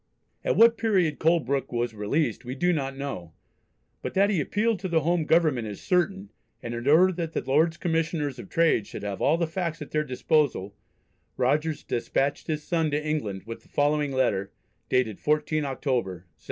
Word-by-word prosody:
At - - +1
what 230 0 +6
period 185 -9 +1
Colebrooke 150 -5 +1
was 120 -1 -1
released 110 +5 -1
we 125 +1 -5
do 175 +5 +2
not 135 -3 -3
know, 90 - -6 0.7
but - - -5
that 200 +2 +4
he 180 -7 +1
appealed 210 +7 0
to 190 - -3
the 165 -3 +2
home 170 +1 +1
Government 155 -9 +2
is 105 -2 -7
certain, 190 +3 0 0.3
and 120 - -4
in 120 +2 -5
order 180 +6 +6
that 165 -2 -4
the - - -2
Lords 160 +5 +2
Commissioners 160 -5 -1
of - - -9
Trade 165 -11 +2
should - - -8
have 100 -1 -4
all 155 +4 +3
the 170 - +1
facts 165 -1 -3
at 150 - -8
their 155 0 +1
disposal 130 -7 0 0.6
Rogers 150 +5 0
despatched 135 +4 -1
his 155 -2 -2
son 165 -2 0
to 150 +1 -2
England 105 -12 -2
with 115 0 -7
the - - -25
following 145 0 +1
letter, 100 -7 0 0.4
dated 115 -5 +1
14 150 0 0
October, 120 - -2
1731. - - -37
150 Hz, 185 wpm, -26 LUFS, 125-165 Hz, 0.7 s, what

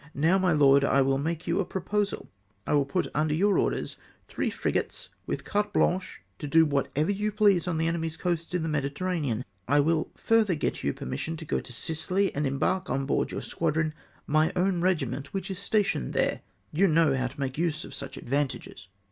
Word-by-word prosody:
Now, 165 +7 +3
my 185 -1 +2
lord, 140 -2 +5
I 140 0 +4
will 135 0 +1
make 165 +3 -2
you 170 +2 0
a - - +2
proposal. 200 +3 -2 0.4
I - - 0
will 145 -1 +3
put 140 - 0
under 155 +1 +1
your 200 +4 +3
orders - - -1 0.3
three - - -2
frigates, - - -2 0.2
with - - -3
carte 210 0 0
blanche 185 - 0 0.2
to 145 - -4
do 160 +2 +5
whatever 150 +3 0
you 210 +2 -1
please 200 -5 +3
on 170 -3 0
the 160 - +1
enemy's 165 -1 -2
coasts 170 -1 -2
in 175 - 0
the - - -1
Mediterranean. 145 -3 -1 0.2
I 145 +3 +4
will 160 +2 +2
further 220 -5 +2
get 150 - -2
you 70 - +1
permission 160 - -4
to 160 - -8
go - - 0
to - - -10
Sicily, 175 +9 0
and 145 0 0
embark 185 +8 0
on 135 0 0
board 135 - 0
your - - -4
squadron 155 0 -1 0.3
my 155 +1 +3
own 180 -1 +1
regiment, 140 -7 -1
wdiich 195 0 -3
is 190 - -5
stationed 200 - 0
there. - - +1 0.3
You 190 +6 +3
know 160 -4 +4
how 130 -1 0
to 140 +4 -12
make 135 +1 -3
use 165 -3 -1
of - - -10
such 140 - -6
advantages." 130 -8 -3
160 Hz, 200 wpm, -27 LUFS, 140-185 Hz, 0.4 s, lord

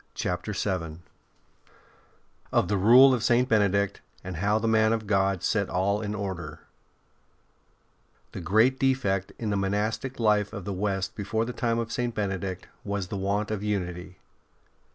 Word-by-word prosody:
CHAPTER 90 +4 -3
VII 90 -5 -3 1.5
OF - - +2
THE 100 - 0
RULE 125 +7 +7
OF 120 -4 -1
SAINT 120 +1 +3
BENEDICT, 100 -2 +2 0.2
AND 90 -2 -6
HOW 105 +4 +1
THE 110 +1 -1
MAN 110 0 +3
OF 110 -1 -2
GOD 95 -2 +1
SET 100 -3 0
ALL 100 +3 0
IN 105 -1 -3
ORDER 95 -5 -5 1.7
The 95 - -7
great 110 +9 +3
defect 110 -8 0
in 110 -3 -3
the 100 - 0
monastic 105 +7 -2
life 105 -2 +2
of 100 -5 -6
the 100 - -3
West 95 0 -2
before 110 +2 -1
the 125 - -5
time 115 -1 0
of 115 -1 -3
St. 120 0 -2
Benedict 95 -3 -3 0.2
was 100 -3 -3
the - - -4
want 100 +2 -1
of 105 -2 -2
unity. 90 -3 -3
100 Hz, 155 wpm, -27 LUFS, 95-110 Hz, 1.7 s, RULE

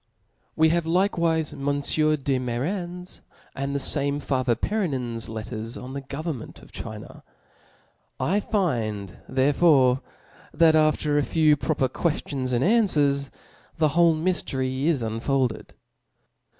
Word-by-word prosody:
We 160 0 +4
have 170 0 +1
likcwife 165 -3 +1
Monfieur 145 +2 +1
de 135 -2 -1
Mairan\ 175 +9 -4 0.3
and 140 +1 -3
the - - +1
fame 140 +1 0
father 130 -4 0
Perennin's 130 - -2
letters 110 +1 -5
on 130 +1 -8
the 140 - -4
govern 140 +1 -5
ment - - -12
of - - -16
China. - - -9 1.0
I 195 +4 +1
find 115 - -2
therefore 135 -1 +4 0.5
that 160 0 +5
after 155 -1 +2
a - - +1
few 155 0 +3
proper 135 -1 0
qucftions 140 -4 -2
and 125 +1 +1
anfwcrs, 150 - +2 0.5
the 155 -2 +3
whole 170 +1 +4
myftery 135 -6 -1
is 155 -7 +1
unfolded. 115 +2 -1
145 Hz, 125 wpm, -25 LUFS, 130-165 Hz, 1.0 s, that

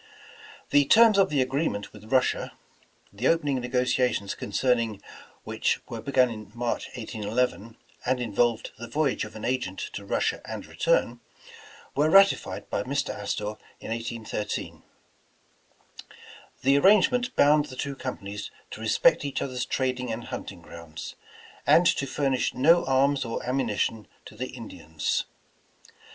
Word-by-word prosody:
The 145 -1 +5
terms 220 +5 +6
of 195 - +4
the 140 -3 +2
agreement 130 -6 -2
with 110 - -13
Russia, 130 -1 +1 0.6
the 115 +6 -1
opening 145 -5 +2
negotiations 125 -4 0
concerning 115 0 0 0.4
which - - 0
were 115 -2 -6
begun 130 0 +3
in 110 -2 -9
March, 120 0 -2
1811, 115 0 -2 0.3
and 130 0 0
involved 120 0 0
the 120 - -6
voyage 140 +3 0
of - - -12
an 110 - -6
agent 120 -7 -1 0.2
to 100 - -6
Russia 100 - -1
and - - -6
return, 120 +1 +1 0.8
were 150 +2 +3
ratified 195 +3 +4
by - - 0
Mr. - - -1
Astor 105 +1 -4 0.2
in - - -7
1813. 115 -2 -4 1.8
The 135 +2 +5
ar - - +2
rangement 240 - +4
bound 150 +1 +5
the 130 - -10
two 140 +1 -4
companies 105 -6 -6 0.2
to - - -8
respect - - +3
each 140 -2 -2
other's 125 -2 -3
trading 125 -2 -1
and 115 +2 -4
hunting - - -7
grounds, 85 -2 -9 0.5
and 175 - +6
to 140 - +2
furnish 135 -1 0
no 165 +6 +5
arms 135 +1 +2
or 115 -2 -4
ammunition 115 -4 -1 0.2
to - - -12
the 130 +4 -4
Indians. 80 -10 -3
125 Hz, 140 wpm, -26 LUFS, 110-140 Hz, 1.8 s, terms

